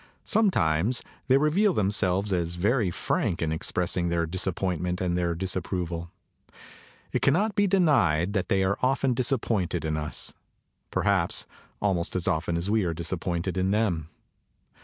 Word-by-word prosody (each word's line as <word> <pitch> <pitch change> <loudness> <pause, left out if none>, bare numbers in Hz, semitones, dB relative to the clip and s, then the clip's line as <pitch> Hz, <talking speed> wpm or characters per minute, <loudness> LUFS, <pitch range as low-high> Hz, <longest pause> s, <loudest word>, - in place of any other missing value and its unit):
Sometimes 120 - +2 0.2
they 130 +1 +5
reveal 175 +8 +3
themselves 100 - +1
as 85 -1 -1
very 105 +3 +1
frank 85 0 -1
in 80 -2 -1
expressing 85 +2 0
their 85 -1 +1
disappointment 90 0 -1
and 90 -2 0
their 85 -1 0
disapproval. 90 -2 -3 1.0
It - - 0
cannot 195 +10 +2
be 205 -1 +2
denied 115 - +3
that 95 -4 -1
they 95 0 +2
are 95 +1 0
often 130 0 +2
disappointed 110 - 0
in 80 0 -1
us 75 0 -4 0.6
perhaps - - +1 0.4
al 100 -2 +3
most 85 0 -2
as 90 -2 -2
often 85 +2 0
as 85 +3 -2
we 110 0 +2
are 85 -2 -1
disappointed 85 +2 -2
in 95 +1 +1
them. 95 -7 0
95 Hz, 145 wpm, -27 LUFS, 85-115 Hz, 1.0 s, they